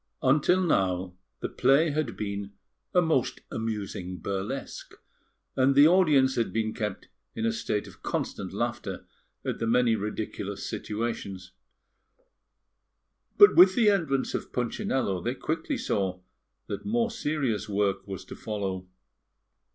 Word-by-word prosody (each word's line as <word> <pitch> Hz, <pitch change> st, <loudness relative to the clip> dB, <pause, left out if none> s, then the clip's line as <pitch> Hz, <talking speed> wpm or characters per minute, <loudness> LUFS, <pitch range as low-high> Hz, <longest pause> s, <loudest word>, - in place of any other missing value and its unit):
Until 150 Hz, +7 st, +4 dB
now, 95 Hz, -, +1 dB, 0.3 s
the -, -, -1 dB
play 150 Hz, +4 st, +3 dB
had 140 Hz, -9 st, -2 dB
been 100 Hz, -1 st, -4 dB, 0.4 s
a 180 Hz, -, +4 dB
most 155 Hz, -6 st, 0 dB
amusing 100 Hz, -5 st, -4 dB
burlesque, 100 Hz, +9 st, -5 dB, 0.6 s
and 135 Hz, +1 st, +3 dB
the 145 Hz, +2 st, +8 dB
audience 155 Hz, -7 st, +4 dB
had 115 Hz, -, 0 dB
been 110 Hz, -1 st, -1 dB
kept 105 Hz, -3 st, -4 dB, 0.3 s
in 115 Hz, -, -2 dB
a 115 Hz, -, +2 dB
state 105 Hz, -2 st, -2 dB
of -, -, -15 dB
constant -, -, -3 dB
laughter -, -, -3 dB, 0.4 s
at -, -, -2 dB
the 115 Hz, -, -1 dB
many 120 Hz, 0 st, +3 dB
ridiculous 105 Hz, 0 st, -4 dB
situations; 100 Hz, -4 st, -4 dB, 1.9 s
but 410 Hz, -, +8 dB
with 185 Hz, +1 st, +8 dB
the 220 Hz, -4 st, +5 dB
entrance 155 Hz, -9 st, 0 dB
of -, -, -4 dB
Punchinello, 120 Hz, -5 st, -1 dB
they 120 Hz, +2 st, -2 dB
quickly 165 Hz, -, -2 dB
saw 95 Hz, -, -1 dB, 0.5 s
that 100 Hz, -, -5 dB
more 230 Hz, +2 st, 0 dB
serious 145 Hz, -, -1 dB
work 100 Hz, -1 st, 0 dB
was 95 Hz, -1 st, -6 dB
to -, -, -9 dB
follow. 95 Hz, -4 st, -4 dB
115 Hz, 130 wpm, -28 LUFS, 100-150 Hz, 1.9 s, the